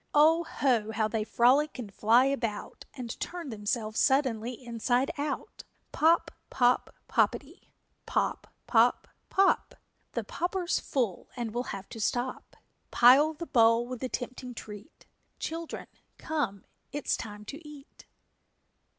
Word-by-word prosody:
_ - - -41
O 320 +3 +6
ho, 240 -9 0
how 220 0 +1
they 215 0 -1
frolic 260 +8 +3
and 215 -6 -7
fly 230 +6 +4
about 230 -7 -3
And 240 -3 -6
turn 345 -4 -5
themselves 215 0 -2
suddenly 255 -4 +2
inside 245 +2 -1
out! 285 -1 -4 0.3
Pop 330 +2 +3 0.2
pop 245 -1 +2
poppetty! - - -1 0.4
Pop - - -1
pop - - +3 0.2
pop! 390 0 +2 0.4
The - - -2
popper's 355 +1 -1
full 235 -9 -2
and 235 -3 -3
we'll 245 +1 -2
have 195 -3 -6
to 230 - -8
stop; 245 +4 -2 0.3
Pile 275 +6 +6
the 335 - -6
bowl 230 -5 +4
with 250 0 -6
the 260 - -3
tempting 250 0 -5
treat, 210 +6 -11 0.3
Children, 330 0 -5 0.3
come, 255 -12 -3 0.3
it 290 0 -5
is - - +2
time 210 -1 -8
to 290 +8 -8
eat! 295 -2 -14
250 Hz, 135 wpm, -29 LUFS, 225-290 Hz, 0.4 s, O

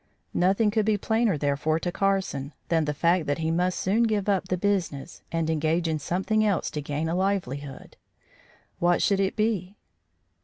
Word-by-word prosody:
Nothing 195 +4 +2
could 215 -1 +1
be 215 -1 +3
plainer, 220 -3 +1
therefore, 145 +2 0
to 175 - -2
Carson 190 -8 -1 0.2
than 165 -2 +2
the 150 - -1
fact 170 +2 +2
that 145 - 0
he 160 0 -1
must 180 +2 0
soon 205 +5 +1
give 215 -4 +1
up 195 -2 +1
the 185 - -1
business 175 -6 -2
and 165 -1 -1
engage 160 +2 +1
in 160 -1 -1
something 190 +8 0
else 200 -6 0
to 150 - -3
gain 145 +2 -3
a 165 - -1
livelihood. 160 -8 -3 0.8
What 175 0 +3
should 200 -1 +2
it 195 0 0
be? 210 -3 -1
180 Hz, 180 wpm, -26 LUFS, 155-200 Hz, 0.8 s, be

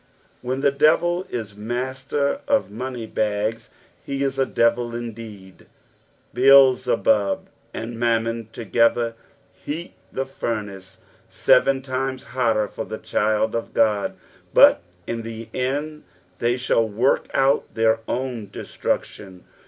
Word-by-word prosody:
When 130 +2 -3
the 140 - +3
devil 175 +5 +2
is 110 -4 -5
master 130 - -2
of 280 - +1
money 125 +1 -5
bags, 110 +1 -2 0.4
be 140 0 -2
is 135 -1 -1
a 135 - +2
devil 120 0 +1
indeed. 110 -6 -9 0.7
Beelzebub 125 -6 +4 0.2
and 115 +1 -6
Mammon 115 -1 0
together 115 +1 +1 0.4
heat 165 +4 -6 0.2
the 135 - -2
furnace 105 -7 -5 0.3
seren 135 -1 +3
times 130 0 -3
hotter 115 -4 0
for 110 - -6
the 110 - -6
child 110 0 0
of 115 - -4
God, 105 -3 +2 0.4
but - - +7 0.2
in 115 +4 -3
the 115 0 -8
end 145 +4 -2 0.4
tbey 120 +1 +1
shall 115 -3 +1
wurk 115 +6 +1
out 135 +1 +2
their 110 0 +3
own 120 -5 -3
destruction. 95 -3 -4
120 Hz, 120 wpm, -23 LUFS, 110-130 Hz, 0.7 s, but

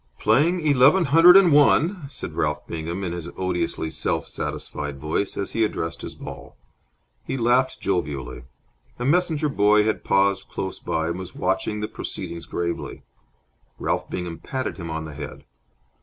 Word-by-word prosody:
"Playing 155 +11 +3
eleven 145 +5 +5
hundred 165 +6 +8
and 190 -4 +6
one," 150 +3 +4
said - - -6
Ralph 75 0 -1
Bingham, 85 +3 -4
in 90 - -2
his 85 -1 -5
odiously 90 -3 -2
self - - -2
satisfied 75 -2 -4
voice, 80 +7 -2
as 100 - -2
he 115 - +1
addressed 85 -6 -2
his - - -7
ball. - - -10 0.7
He - - -3
laughed 125 +2 +2
jovially. 70 -9 -3 0.5
A 120 - -3
messenger 160 0 +2
boy 105 -5 +4
had 110 0 -1
paused 100 0 +2
close 95 -1 -4
by 80 0 -1
and 85 +2 -3
was 95 - -8
watching 105 -1 -1
the 105 - -2
proceedings 85 -5 -7
gravely. 85 0 -4 0.7
Ralph - - -2
Bingham 90 -2 -5
patted 130 -1 -4
him 85 -3 -6
on 80 0 -4
the 80 - -8
head. 75 -1 -8
100 Hz, 155 wpm, -24 LUFS, 85-135 Hz, 0.7 s, hundred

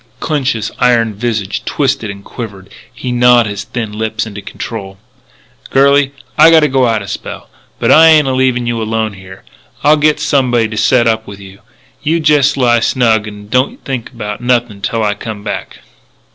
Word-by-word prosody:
Clinch's 130 -8 -1
iron 120 -3 +2
visage 110 -2 -3
twitched 140 -1 -1
and 100 -2 -7
quivered. 100 -5 -8 0.2
He 125 - -6
gnawed 120 -1 +4
his 100 -1 -5
thin 115 -2 -5
lips 110 +1 -3
into 100 -2 -8
control: 100 -3 -7 0.7
"Girlie, 140 0 +3 0.3
I 165 - +8
gotta 160 -2 +5
go 130 -1 +2
out 110 -3 0
a - - -10
spell. - - -7 0.3
But - - +1
I 160 +1 +7
ain't 155 -3 +5
a 130 - 0
leavin' 130 -2 +1
you 120 -1 -2
alone 110 -1 -2
here. 95 -1 -13 0.4
I'll 150 +1 +5
git 150 0 +2
somebody 130 -7 +1
to 110 - -6
set 120 +2 +3
up 110 -1 0
with 100 -1 -10
you. 95 0 -13 0.4
You 160 +3 0
jest 150 -2 +3
lie 120 -3 +3
snug 115 -3 +1
and 105 0 -10
don't 125 +4 -1
think 130 -3 -4
about 105 -3 -6
nothin' 120 -4 0
till 115 +3 -1
I 105 -1 +1
come 105 0 -8
back." - - -6
120 Hz, 180 wpm, -14 LUFS, 105-130 Hz, 0.7 s, I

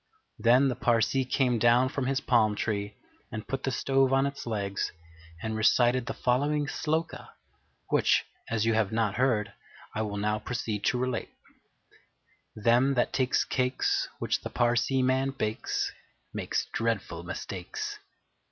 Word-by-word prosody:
Then 125 +5 +5
the 125 - 0
Parsee 120 +3 +2
came 125 -4 +2
down 120 +3 +5
from 135 -2 -2
his 135 0 0
palm 110 -4 +3
tree 105 -1 -2 0.4
and 110 0 -6
put 135 -1 -3
the 135 - -1
stove 135 0 +2
on 135 +1 +3
its 140 -3 -5
legs 100 -3 -2 0.5
and 110 0 -2
recited 120 +3 +3
the 135 - -3
following 145 +4 +1
Sloka, 160 +2 -2 0.6
which, - - +3 0.2
as 110 -1 0
you 115 - +3
have 110 -2 +1
not 110 -2 0
heard, 120 -5 +1 0.4
I 110 - -2
will 105 -2 -3
now 105 +1 0
proceed 110 -3 -3
to - - +2
relate: 130 -1 -2 1.3
Them 120 +5 +3
that 120 - +1
takes 130 -1 +2
cakes 130 0 0
Which - - -1
the - - -5
Parsee 120 +2 +2
man 130 +1 +1
bakes 110 -2 -1 0.4
Makes - - -1
dreadful 110 -7 -1
mistakes. 90 +1 -5
120 Hz, 145 wpm, -28 LUFS, 110-130 Hz, 1.3 s, Then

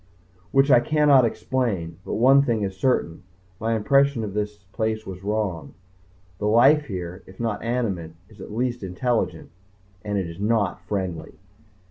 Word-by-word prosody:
which 135 +1 +3
I 120 - +8
cannot 145 -1 +4
explain. 110 -8 -2
But - - -4
one 135 +4 +6
thing 115 -6 0
is 95 -1 -3
certain. 95 -7 0 0.4
My 110 - -2
first - - +1
impression 135 +2 +2
of 100 -3 -5
this 105 -1 -4
place 110 0 -2
was 95 -2 -8
wrong. 100 -8 -3 0.6
The 105 - -1
life 135 +8 +5
here, 90 -3 -6
if 95 - -15
not 115 -3 -2
animate, 105 -9 -2
is 105 -2 -16
at - - -9
least 120 +2 -2
intelligent 95 -2 -2 0.5
and 105 -1 -2
it 95 - -1
is 85 +2 -9
not 105 -3 0
friendly. 90 -6 -3
110 Hz, 160 wpm, -24 LUFS, 95-125 Hz, 0.6 s, I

